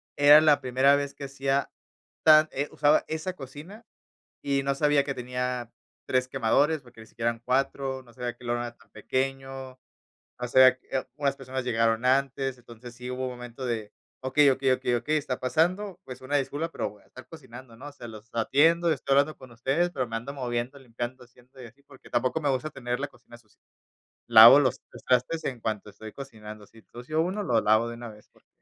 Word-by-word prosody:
era 145 +1 +8
la 155 -2 +4
primera 130 +2 +3
vez 140 0 -3
que 140 - -8
hacía 135 0 -1 0.5
tan 155 0 +7
eh, 140 +2 -3
usaba 150 +1 +3
esa 160 +4 -4
cocina 160 - -11 0.6
y 140 -1 0
no 140 0 0
sabía 145 0 +2
que 140 -1 -3
tenía 125 -1 -4 0.4
3 130 0 +1
quemadores 135 +5 +1
porque 120 -2 -17
ni - - -14
siquiera 115 +1 -2
eran 115 0 -9
4, 130 +1 -1
no 120 -2 -19
sabía 125 -2 -4
que 125 - -17
el 120 - -3
horno 120 0 0
era 120 0 -8
tan - - -25
pequeño, 135 0 -4 0.7
o 125 - -3
sea, 130 +1 +7
eh, 130 - -8 0.2
oh, - - -10
unas 140 -2 0
personas 130 -1 -5
llegaron 115 -1 +1
antes, 135 0 +1
entonces 120 0 -13
sí 125 +1 -7
hubo 130 +1 -3
un 130 - -4
momento 125 +1 -8
de: 110 -4 -3 0.3
"Okey, 140 +2 +4
okey, 135 0 +1
okey, 125 -1 0
okey, 135 +6 0
está 140 -4 -3
pasando". 180 +8 0
Pues, 130 -1 -9
una 130 +3 -3
disculpa, 145 +4 -2
pero - - -3
voy 105 -1 -20
a - - -28
estar 130 0 -14
cocinando, 130 -5 -12
¿no?, 140 - -10
o - - -14
sea, 120 -4 -10
los 110 0 -12
atiendo, 160 +9 +3
estoy 140 -2 0
hablando 145 +3 +2
con 130 - -13
ustedes, 135 +9 0
pero 130 -6 -2
me 115 - -5
ando 130 +5 -7
moviendo, 125 0 -3
limpiando, 125 0 -7
haciendo 125 +2 -19
y - - -9
así, 125 +5 -21
porque 140 -2 -17
tampoco 130 +5 0
me 145 - 0
gusta 135 +3 -1
tener 125 -2 -4
la 145 - -2
cocina 120 -3 -17
sucia. 110 -3 -29 0.7
Lavo 115 +3 +10
los 130 -4 0 0.3
trastes 130 +6 +1
en 125 -3 -4
cuanto 110 -2 -4
estoy 110 +1 -11
cocinando. 110 -6 -10
Si 115 - -20
ensucio 125 +7 -4
1, 190 +5 -2
lo 115 - +2
lavo 110 +2 +3
de 120 - -6
una 120 0 -8
vez, 105 0 -17
porque, - - -30
130 Hz, 210 wpm, -27 LUFS, 120-140 Hz, 0.7 s, Lavo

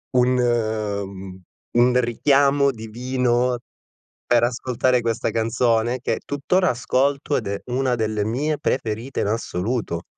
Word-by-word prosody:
un, 125 0 +4
mhmm, 100 -5 -2 0.3
un 125 +1 +4
richiamo 140 +3 +3
divino 125 +1 -1 0.7
per 120 -1 +3
ascoltare 125 +1 +1
questa 115 -1 -1
canzone, 115 +1 +1
che - - -1
tutt'ora 165 +5 +1
ascolto 135 +4 0
ed - - -3
é 100 0 -3
una 125 0 0
delle 110 -2 -1
mie 145 +8 -1
preferite 120 -2 -2
in - - 0
assoluto. 105 -3 -2
120 Hz, 120 wpm, -22 LUFS, 110-130 Hz, 0.7 s, un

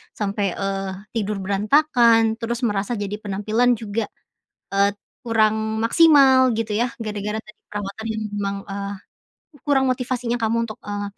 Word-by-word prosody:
sampai, 200 -2 -1
eee, 195 -1 -2 0.3
tidur 210 -2 -1
berantakan, 225 +1 +3
terus 235 +1 -3
merasa 205 +1 0
jadi 205 0 -3
penampilan 215 +5 +1
juga, 215 0 -3 0.7
eee, 200 0 +4 0.4
kurang 220 0 +1
maksimal 265 -2 +6
gitu 225 -1 -2
yah, 240 - +2 0.2
gara-gara 210 0 -3
tadi 215 - -17
perawatan 205 +2 -6
yang 220 -1 -3
memang, 200 -1 -2
eee, 200 0 -4 0.7
kurang 270 -2 +2
motivasinya 245 -1 -1
kamu 230 0 0
untuk, 215 - -7
eee, 205 0 -4
220 Hz, 135 wpm, -22 LUFS, 205-235 Hz, 0.7 s, maksimal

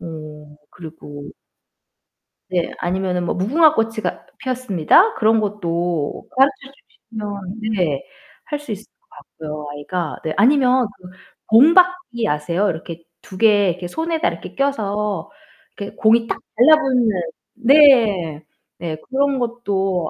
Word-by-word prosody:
어 - - -9 0.6
그리고 150 -4 -11 1.2
네. 175 -2 -1
아니면은 180 0 -2
뭐 - - -2
무궁화 295 - +3
꽃이가 225 -1 -2
피었습니다. 255 - +2
그런 220 0 +3
것도 175 -6 -3
가르쳐 270 +1 +1 0.4
주시면 205 -2 -6 0.2
네, 155 -8 -1 0.4
할 295 -1 -4
수 290 -6 -9
있을 210 +1 -6 0.2
것 - - -43 0.4
같고요 150 0 -6
아이가. 155 +3 -4
네. 155 - -2
아니면 255 +1 +4
그 180 - -12 0.4
공 260 +10 +7
받기 360 -11 +2
아세요? 170 +7 0
이렇게 165 0 -7 0.2
2 190 - -12
개 205 -3 +4
이렇게 175 0 -4
손에다 320 - -2
이렇게 - - -6
껴서 210 -7 -2 0.5
이렇게 200 -2 -7
공이 230 +1 +3
딱 - - -4 0.2
달라붙는 260 -3 +4 0.4
네. 230 - +4 0.4
네. 165 -2 -4
그런 275 0 +1
것도 195 -8 -2
210 Hz, 255 characters per minute, -19 LUFS, 175-260 Hz, 1.2 s, 공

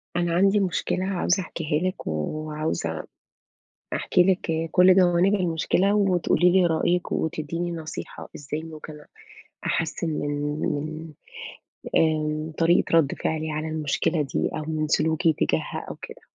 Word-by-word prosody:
أنا 175 -1 0
عندي 195 +3 +4
مشكلة 185 0 -1
عاوزة 190 0 +1
أحكيها 165 -1 -2
لِك، 185 - -9
وعاوزة 115 - -3 0.9
أحكي 180 - +3
لِك 165 -3 0
كُلّ 180 +1 +6
جوانب 180 +1 +4
المشكلة، 185 +2 +1
وتقولي 180 -3 +3
لي 185 0 +4
رأيِك، 175 +2 +1
وتدّيني 165 +2 -2
نصيحة 160 -2 -7
إزّاي 150 +2 -5
ممكن 155 -1 -9 0.7
أحسِّن 160 +1 -1
من 145 -1 -2 0.2
من - - 0
ال 155 +2 -6 0.9
آمم، 155 0 -1
طريقة 170 +1 +3
ردّ 145 -4 +1
فِعلي 160 0 -2
على 155 +1 -3
المشكلة 155 +1 0
دي 135 - -1
أو 155 - -3
من 155 -1 -1
سلوكي 160 +2 +2
تجاهها - - -2
أو - - -6
كده - - -9
160 Hz, 130 wpm, -25 LUFS, 155-180 Hz, 0.9 s, كُلّ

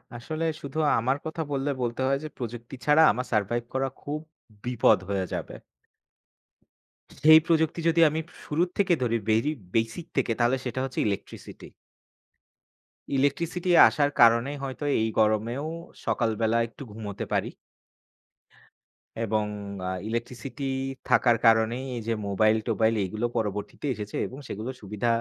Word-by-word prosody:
আসলে 155 +7 -4 0.2
শুধু 140 +2 -7 0.2
আমার 130 +4 +1
কথা 160 +1 -4
বললে 140 +1 -1
বলতে 120 +1 -2
হয়, 135 0 +2
যে - - -4
প্রযুক্তি 120 +1 -6
ছাড়া 150 +2 +6
আমার 125 +4 -3
survive 115 +2 0
করা 135 0 0
খুব 150 +1 -4 0.5
বিপদ 120 -4 +4
হয়ে 95 -2 0
যাবে। - - -4 1.7
সেই 155 +1 +9
প্রযুক্তি 160 0 +2
যদি 165 0 +3
আমি 160 +2 -2 0.3
শুরুর 170 +4 0
থেকে 190 -3 +3
ধরি 115 -1 +1
বেরি 115 +8 +3 0.2
বেসিক 115 +9 -1
থেকে, 125 -3 +2
তাহলে 120 +3 +3
সেটা 125 +1 -3
হচ্ছে 135 - -4
ইলেকট্রিসিটি। 100 - -6 1.5
ইলেকট্রিসিটি 170 +6 0 0.2
আসার 145 -1 +2
কারণে 115 +3 +6
হয়তো 135 +2 -5 0.2
এই 110 - +2
গরমেও 110 +6 +1 0.4
সকাল 115 -3 +1
বেলা 110 +1 +2
একটু 140 - -11
ঘুমোতে 105 -2 -6
পারি। - - +1 1.7
এবং 110 -1 0 0.4
আ - - -1 0.2
ইলেকট্রিসিটি 120 +4 -5 0.5
থাকার 120 -2 +4
কারণেই, 115 +3 +3
এইযে 115 0 -2
মোবাইল-টোবাইল 110 +2 +2
এগুলো 110 +5 -3
পরবর্তীতে 105 +5 -3
এসেছে 105 -1 -7
এবং 130 - -10
সেগুলো 110 +5 -5
সুবিধা 105 +3 -3
120 Hz, 130 wpm, -26 LUFS, 110-145 Hz, 1.7 s, সেই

